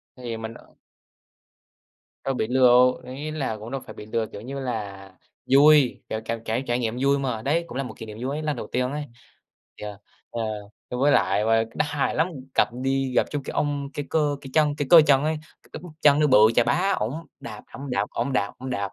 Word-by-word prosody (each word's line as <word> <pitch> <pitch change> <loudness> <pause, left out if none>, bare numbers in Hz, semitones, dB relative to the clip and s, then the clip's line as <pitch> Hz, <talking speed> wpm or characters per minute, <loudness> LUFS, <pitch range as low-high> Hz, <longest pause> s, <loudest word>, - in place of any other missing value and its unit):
Thì 120 -3 -5
mình, 110 0 -6
ờ - - -17 1.5
Đâu 135 - -1
bị 110 -3 -1
lừa 130 0 +4 0.4
đâu, 125 - -9
ý 150 +2 -5
là 135 -8 -3
cũng 110 +4 -9
đâu 135 -2 -3
phải - - -9
bị 105 - -10
lừa. 110 0 -1
Kiểu 100 - -10
như 135 +4 -6
là 100 -6 -5 0.4
vui, 145 -1 +6
kiểu 110 - -2
cảm 115 0 -4
cảm 115 +3 -1
trải 120 +1 0
nghiệm 115 0 -2
vui 140 0 +3
mà. 125 -5 -2
Đấy 160 +7 +1
cũng 125 - -7
là 135 - -1
một 125 - -7
kỷ 115 - -7
niệm 105 0 -9
vui 135 +3 -2
ấy, 155 - -4
lần 150 -2 -1
đầu - - -6
tiên 125 +1 -1
ấy. 145 0 -4 0.7
Thì, - - -9
ờ, 105 -1 -7 0.3
ờ, 115 - -4 0.5
ơ, 125 - -3
với 145 +2 +4
lại 100 +2 +2
và 115 0 +3
đó - - +1
hài 145 -2 -1
lắm. 160 +3 +2 0.3
Gặp - - +4
đi 135 -1 0
gặp - - +4
trúng 145 -2 -3
cái - - -6
ông, 145 -1 -1
cái 145 - -4
cơ 150 -2 +1
cái 135 - -10
chân 150 -2 +3
cái 145 - -2
cơ 170 -2 +10
chân 140 0 +4
ấy, 155 0 0
c 155 +1 -17
cái - - -7
bắp 175 -3 -10
chân 145 -1 +6
nó 150 - +4
bự 130 -6 +6 0.2
chà 120 - +5
bá, 180 +11 +2
ổng 110 +6 -1 0.3
đạp, 110 -3 -8
ổng 140 -1 -7
đạp, 100 -3 0
ổng 125 +4 -2
đạp, 100 -5 0
ổng 130 +1 -6
đạp. 100 -4 -3
130 Hz, 245 wpm, -24 LUFS, 115-145 Hz, 1.5 s, cơ